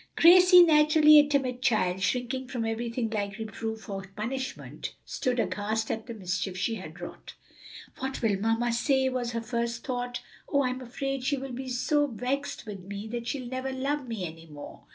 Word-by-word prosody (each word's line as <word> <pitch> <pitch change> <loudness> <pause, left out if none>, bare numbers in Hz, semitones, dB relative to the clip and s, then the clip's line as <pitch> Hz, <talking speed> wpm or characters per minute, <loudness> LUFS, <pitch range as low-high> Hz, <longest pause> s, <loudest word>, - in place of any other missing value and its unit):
Gracie, 360 +1 +8
naturally 305 -1 +7
a 290 - +5
timid 260 -4 0
child, 190 -7 +1
shrinking 250 +4 -1
from 245 -3 -3
everything 230 +1 -2
like 200 -2 -2
reproof 220 0 -5
or 195 -2 -4
punishment, 260 +5 -5
stood 250 -1 -1
aghast 220 0 -1
at 225 +1 -4
the 235 - -5
mischief 190 -1 -3
she 195 +5 0
had 165 -5 -8
wrought. 175 - -9 0.6
"What 265 +1 -3
will 205 -4 +2
mamma 225 +3 +1
say?" 265 +2 +2
was 245 -2 -2
her 230 - -2
first 235 0 -3
thought. 245 -1 -3 0.3
"Oh, 280 0 +3
I'm 255 0 -2
afraid 270 +2 -4
she 285 +2 +1
will 270 0 -6
be 260 +1 -5
so 290 +4 +1
vexed 255 +3 -3
with 205 -3 -7
me 200 +3 -7
that 235 0 -4
she'll 260 -1 -3
never 260 +2 -3
love 270 +1 -2
me 220 -6 -3
any 165 0 -9
more!" 145 -2 -11
245 Hz, 180 wpm, -28 LUFS, 220-265 Hz, 0.6 s, Gracie